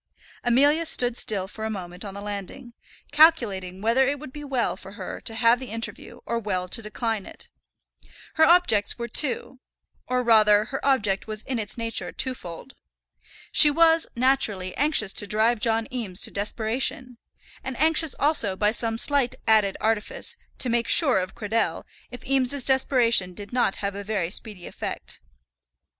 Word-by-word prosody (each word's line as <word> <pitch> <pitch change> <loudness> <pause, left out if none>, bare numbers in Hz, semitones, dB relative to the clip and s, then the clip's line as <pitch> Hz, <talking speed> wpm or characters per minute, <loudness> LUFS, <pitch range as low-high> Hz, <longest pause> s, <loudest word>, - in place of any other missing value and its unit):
Amelia 285 +7 +3
stood 245 -6 +2
still 200 -6 0
for 220 +2 -9
a 220 - -2
moment 180 -3 -7
on 200 -2 -8
the 200 - -7
landing, 210 +5 -7 0.4
calculating 210 - +3
whether 245 +4 +3
it 285 +1 -1
would 270 -2 -11
be 295 - -8
well 270 -4 -1
for 195 - -12
her 195 -3 -7
to 225 - -3
have 230 +1 +3
the 260 - -8
interview, 225 +1 -6
or 235 - -2
well 185 -4 -3
to 230 - -2
decline 220 -1 -4
it. - - -12 0.8
Her 315 - +3
objects 315 - +3
were 235 -1 -5
two; 260 +1 0 0.5
or, 250 0 0
rather, 215 -2 +4
her 270 - -6
object 210 -9 0
was 215 0 -4
in 255 -3 -3
its 210 +1 -6
nature 230 -1 -3
twofold. 250 -3 -6 0.8
She 300 - +7
was, 325 +2 +3
naturally, 235 -8 0
anxious 280 -9 +2
to 205 - -2
drive 220 +3 +1
John 225 0 +1
Eames 210 -7 -4
to - - 0
desperation; 230 +4 -2 0.4
and 265 -2 -6
anxious 320 0 +4
also, 280 -10 +1
by 210 +2 +1
some 225 0 -2
slight 275 0 +1
added 215 -3 +3
artifice, 220 -1 -2 0.2
to 255 - -3
make 235 0 0
sure 270 - +4
of 185 0 -5
Cradell 225 0 -2 0.3
if 245 - -11
Eames's 270 0 +1
desperation 240 -8 +2
did 205 +4 -9
not 245 -6 +1
have 200 0 -3
a 200 +1 -7
very 195 -5 -2
speedy 205 -4 -4
effect. - - -7
230 Hz, 165 wpm, -24 LUFS, 205-265 Hz, 0.8 s, She